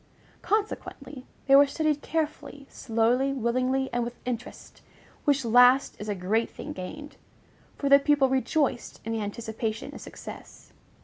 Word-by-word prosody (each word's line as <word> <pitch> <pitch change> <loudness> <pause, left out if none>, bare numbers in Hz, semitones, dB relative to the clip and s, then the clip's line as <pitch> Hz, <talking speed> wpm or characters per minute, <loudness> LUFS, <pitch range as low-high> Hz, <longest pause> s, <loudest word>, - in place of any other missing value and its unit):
Consequently, 300 -10 -3 0.2
they 275 - +6
were 285 +1 +7
studied 305 0 0
carefully, 295 -3 -3
slowly, 240 +4 +1
willingly, 255 +1 0
and 240 0 0
with 240 +1 -6
interest, 250 0 -6 0.4
which 280 -3 +2
last 245 +3 +5
is 210 - -5
a 205 - -1
great 205 +5 0
thing - - -8
gained; 290 +11 -8 0.6
for 280 - -2
the 280 0 +7
pupil 285 -1 +3
rejoiced 265 0 -1
in 225 - -3
the 225 -1 -2
anticipation 220 +2 -4
of - - -10
success. - - -11
260 Hz, 140 wpm, -27 LUFS, 230-280 Hz, 0.6 s, were